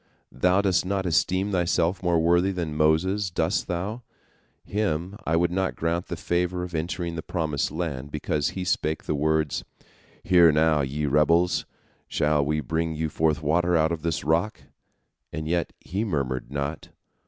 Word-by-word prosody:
Thou 90 +9 +2
dost 95 -4 +2
not 95 0 -1
esteem 95 +3 +1
thyself 90 0 +1
more 85 -2 +2
worthy 85 +3 +3
than 85 -5 -3
Moses, 90 +6 +2
dost 85 - 0
thou? 95 +7 -3 0.6
Him 95 -3 -2
I 80 - +2
would 85 +1 +2
not 95 +1 -1
grant 85 +2 -1
the 85 - -4
favor 90 +2 -1
of 90 -1 -7
entering 85 +1 -2
the 80 - -4
promised 80 -5 -1
land, 75 -5 -4
because 75 +1 -1
he 95 - -2
spake 80 -3 -1
the - - -2
words, 75 0 0 0.6
'Hear 85 -3 +6
now, 75 0 +3
ye 70 +3 -2
rebels; 80 +5 +2 0.4
shall 75 -1 +1
we 75 +2 0
bring 80 +1 -2
you 80 0 -2
forth 75 -1 0
water 85 +3 +2
out 80 +1 +2
of 85 -2 -3
this 80 0 -2
rock?' 85 +8 0 0.7
And 80 +1 -4
yet 85 -1 0
he 95 +6 -3
murmured 65 - -2
not. 70 +2 -4
85 Hz, 165 wpm, -25 LUFS, 75-90 Hz, 0.7 s, Hear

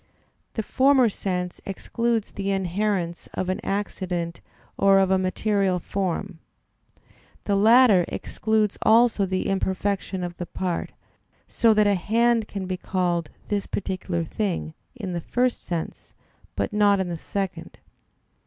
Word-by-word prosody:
The 220 - -1
former 260 0 +4
sense 180 -3 -3
excludes 230 +3 -2
the 200 0 -3
inherence 190 -2 -1
of 185 - -2
an 185 - -1
accident 180 -4 -3 0.3
or 195 0 +5
of 190 -1 +3
a 190 - +4
material 190 0 +1
form; 185 -1 -3 1.0
the 200 - +1
latter 215 -3 +6
excludes 215 -2 -1
also 225 -3 +4
the 185 0 -1
imperfection 190 -1 -1
of 175 -1 -5
the 175 - -5
part, 180 -1 -3 0.6
so 225 -2 +3
that 210 0 +4
a 205 - +4
hand 230 +4 +2
can 195 -2 -5
be 185 0 -3
called 175 -4 -1 0.2
"this 205 -1 -1
particular 185 -3 -3
thing" 175 -2 -3 0.2
in 200 -7 -5
the 170 - -2
first 250 +7 0
sense, 170 -2 -5 0.4
but - - -2
not 205 -1 +4
in 190 - -1
the 170 - -3
second. 185 -4 -4
195 Hz, 135 wpm, -24 LUFS, 180-210 Hz, 1.0 s, latter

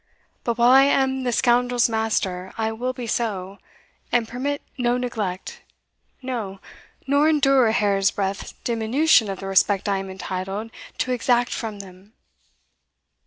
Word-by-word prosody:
But 235 -1 -1
while 240 +1 +5
I 265 +1 +8
am 265 -2 +1
the 245 - +1
scoundrel's 245 0 +3
master 210 -5 -2
I 220 0 -1
will 245 +3 -3
be 250 -1 -7
so, 200 -4 -3 0.5
and 240 -2 +2
permit 280 +5 -3
no 245 -1 +1
neglect 215 -7 -4 0.6
no, 220 -7 -4 0.5
nor 285 +3 +3
endure 275 -5 +4
a - - +2
hair's 200 -3 +2
breadth 195 0 -4
diminution 235 +1 +3
of 195 - -4
the - - -6
respect 195 +1 +2
I 200 -1 +1
am 195 0 -6
entitled 190 +3 -5 0.3
to 255 +3 -1
exact 245 0 +1
from 215 -3 -5
them." 190 +2 -16
225 Hz, 145 wpm, -23 LUFS, 195-250 Hz, 0.6 s, I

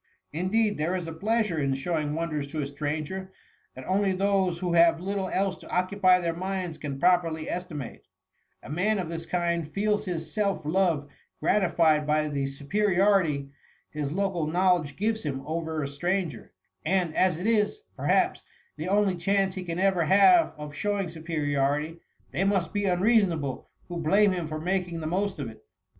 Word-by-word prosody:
Indeed, 205 +4 +1
there 165 +5 0
is 175 -3 -3
a 165 - -5
pleasure 210 -1 0
in 135 -2 +1
showing 150 +1 -2
wonders 155 -3 -2
to 155 +1 -4
a - - -2
stranger, 155 +6 -4 0.4
that 130 - -9
only 195 +1 +1
those 190 -2 +1
who 175 -1 -2
have 165 -1 +5
little 190 +1 -2
else 195 -1 0
to - - -14
occupy 185 0 +3
their 170 -2 -1
minds 185 -1 -4
can 140 -2 -5
properly 165 -2 +2
estimate: 150 - -6 0.6
a - - -10
man 200 +7 +1
of 180 -4 -3
this 165 0 -6
kind 170 -3 -1
feels 210 +1 0
his 165 -4 -4
self 200 -7 0
love 165 -3 +1 0.3
gratified 165 -6 +2
by 155 0 +2
the 140 -2 -1
superiority 175 -1 +1 0.4
his 150 -2 -3
local 185 -3 -1
knowledge 175 -3 +2
gives 220 +2 0
him 135 -3 -4
over 160 -1 -2
a - - -2
stranger; 175 +4 -2 0.3
and, 175 -1 0
as 185 -4 +3
it 180 - -5
is, 225 - +1
perhaps, - - +1 0.4
the 155 +3 -4
only 200 -1 +2
chance 195 +2 +1
he 185 - -5
ever 185 +2 +1
can 160 - 0
have 330 - +6
of 150 -1 -7
showing 200 +3 -1
superiority, 150 -1 -1 0.3
they 185 - 0
must 195 -2 +1
be 205 -1 0
unreasonable. 180 - +1 0.2
who 175 - -5
blame 195 +6 +4
him 175 -3 -2
for 155 0 -4
making 180 0 -1
the 155 - -5
most 190 +4 -1
of 140 -4 -4
it. 110 -1 -12
175 Hz, 170 wpm, -27 LUFS, 155-195 Hz, 0.6 s, have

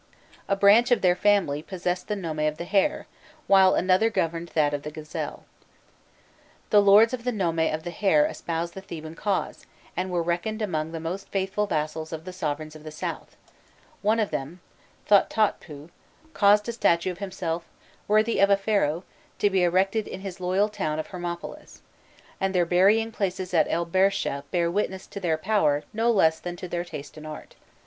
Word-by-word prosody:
A 195 - +2
branch 205 +4 +5
of 245 - +3
their 180 -1 +4
family 190 -8 +2
possessed 180 +1 -3
the 210 - -1
nome 165 -6 -4
of 155 0 0
the 170 - -5
Hare, 200 +10 +1 0.4
while 190 -1 +5
another 185 +5 +3
governed 170 -4 -2
that 150 -2 +2
of 145 - -2
the 150 - -6
Gazelle. 155 0 -6 1.3
The 210 - +7
lords 205 +4 +6
of 245 -2 -4
the 250 - 0
nome 175 -7 -1
of 160 -1 0
the 175 - -5
Hare 165 -5 +3
espoused 170 0 -3
the 190 - -8
Theban 160 -4 -8
cause, 195 +3 -3 0.3
and 185 +2 -2
were 175 -2 0
reckoned 175 +6 -2
among 160 -7 -2
the 165 - -5
most 175 +4 -5
faithful 195 +2 -1
vassals 155 -1 -3
of 160 0 -6
the 185 - -7
sovereigns 155 -3 -4
of 155 - -12
the 155 - -7
south: 155 - -6 0.6
one 215 +2 +2
of 215 - 0
them, 145 +7 -4 0.5
Thothotpû, 190 -7 +1 0.4
caused 205 +1 +4
a - - -1
statue 170 -5 +2
of 180 - -10
himself, 175 -4 -3 0.4
worthy 215 +2 +2
of 200 - +5
a 200 - +5
Pharaoh, 195 -5 0 0.3
to 205 - +2
be 190 -1 +2
erected 190 +5 +1
in 190 - -7
his 190 -2 -7
loyal 185 +3 +1
town 155 -8 -3
of 155 - -4
Hermopolis, 175 -2 -7 0.6
and 195 0 -1
their 175 -1 +3
burying 200 +6 +3
places 185 -3 -3
at 165 - +4
el 170 +1 0
Bersheh 185 -5 +1
bear 170 -1 0
witness 190 -1 -2
to - - -8
their 165 -4 0
power 155 -6 +1
no 225 +2 +1
less 160 -8 +3
than 175 0 -6
to 180 - -7
their 175 0 -3
taste 155 -3 -9
in 155 - -11
art. 155 - -9
180 Hz, 185 wpm, -25 LUFS, 160-200 Hz, 1.3 s, The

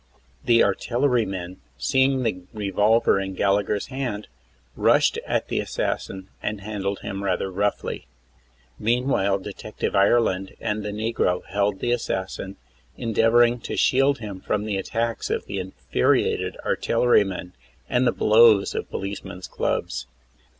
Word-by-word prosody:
The 115 -1 +5
artillerymen, 100 -5 0 0.2
seeing 130 0 +2
the 105 -6 -1
revolver 105 +1 +2
in 95 -1 -4
Gallagher's 100 +1 +1
hand, 125 -6 -4 0.5
rushed - - +3
at - - 0
the - - -1
assassin 95 0 -3
and 105 -2 -3
handled 100 -1 -3
him. 100 0 -5
rather 95 0 -1
roughly. 100 -8 -2 0.7
Meanwhile 115 -4 +1
Detective 105 +2 -5
Ireland 100 -2 +2
and 105 -1 -2
the 105 - -4
negro 105 -4 -1
held 100 0 -1
the 120 - 0
assassin, 95 -4 -3 0.4
endeavoring 115 +1 +3
to - - -5
shield 135 +2 +3
him 105 -5 -7
from 105 0 -1
the 105 -2 -1
attacks 115 +4 -2
of - - -1
the 100 -1 -4
infuriated 95 -8 0
artillerymen 95 -7 +1 0.3
and 125 +1 +2
the - - +4
blows 110 -2 +5
of - - -3
the - - -36
policemen's 95 -2 -6
clubs. - - -2
105 Hz, 130 wpm, -24 LUFS, 95-115 Hz, 0.7 s, The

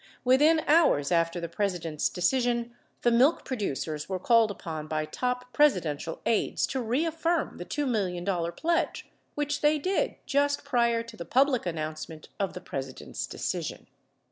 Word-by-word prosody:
Within 295 +6 +5
hours 300 - +3
after 170 0 +2
the 170 - -4
President's 170 -4 -1
decision, 240 +4 0 0.3
the 240 - +4
milk 260 +8 +4
producers 155 - -3
were 190 - -1
called 230 +3 +4
upon 160 -6 -6
by 155 0 -1
top 250 +6 -3
Presidential 170 - +1
aides 225 - +1
to 265 - -3
reaffirm 325 +7 0
the 175 - -6
$2 290 +6 -2
million 185 -7 -1 0.3
pledge 335 +1 -1 0.2
which 295 0 -1
they 300 +1 +4
did 385 - 0
just 285 0 +1
prior 235 -4 +2
to 230 - -11
the 170 - -6
public 255 - +2
announcement 155 -1 -5
of 195 -2 -1
the 180 - -7
President's 135 -5 -5
decision. - - -4
230 Hz, 145 wpm, -28 LUFS, 170-285 Hz, 0.3 s, Within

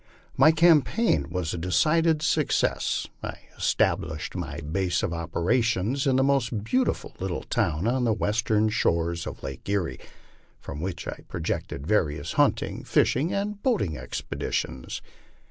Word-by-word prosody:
My 155 - +7
campaign 160 - +3
was 85 -2 -2
a 85 - -3
decided 155 - +2
suc 160 - +1
cess. - - +1 0.2
I - - -5 0.2
established 80 -1 0
my - - -4
base 85 +3 -1
of 85 - -1
operations 100 - 0
in 130 -1 +3
a 130 - +4
most 125 -6 +1
beautiful 255 - 0
little 95 -2 -3
town 80 +3 0
on 125 +1 +1
the 115 - +3
western 110 0 +1
shores 85 -5 0
of - - -8
Lake 70 +6 -7
Erie, 100 -4 -1 0.6
from 75 - -7
which 90 -1 -4
I - - -5
projected 80 -4 -3
various 80 -6 0
hunting, - - +1
fish - - +3
ing, 145 +8 0
and 205 +1 -2
boating 200 - +1
expeditions. 65 -2 -4
100 Hz, 145 wpm, -26 LUFS, 85-140 Hz, 0.6 s, My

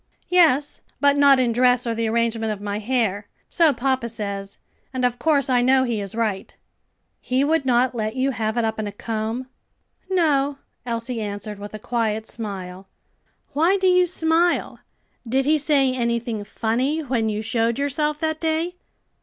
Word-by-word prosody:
"Yes, 315 -6 +3 0.2
but 285 0 +4
not 280 -2 +6
in 245 -2 +2
dress 250 +1 +3
or 230 - -1
the 230 0 -1
arrangement 225 -1 0
of 210 - -4
my 205 0 -3
hair. 210 -3 -1 0.2
So 330 -3 +3
papa 260 -2 -1
says, 200 -3 -5 0.3
and 255 -1 -1
of 245 0 -1
course 295 -4 +2
I 250 -2 +3
know 260 +1 +4
he 235 -4 -1
is 200 +1 -6
right." 215 -4 -2 0.6
"He 255 +2 0
would 310 -1 +1
not 250 +1 +3
let 220 -1 -3
you 265 +1 +1
have 220 -2 -2
it 235 - +2
up 220 0 -2
in 215 - -2
a - - -4
comb?" 225 +4 -4 0.6
"No," 290 -6 +2 0.3
Elsie 230 0 -2
answered 205 0 -5
with 205 +1 -8
a - - -4
quiet 220 -1 -2
smile. 195 -4 -6 0.7
"Why 335 +7 +3
do 380 - -1
you 365 -1 +4
smile? 335 0 +1 0.5
Did 265 +2 +1
he 305 +1 +3
say 275 -3 +2
anything 235 -3 -2
funny 250 +9 -1
when 240 -6 -1
you 215 0 -3
showed 230 0 0
yourself 290 +2 -1
that 315 -1 -1
day?" 325 +2 -1
245 Hz, 170 wpm, -22 LUFS, 220-285 Hz, 0.7 s, not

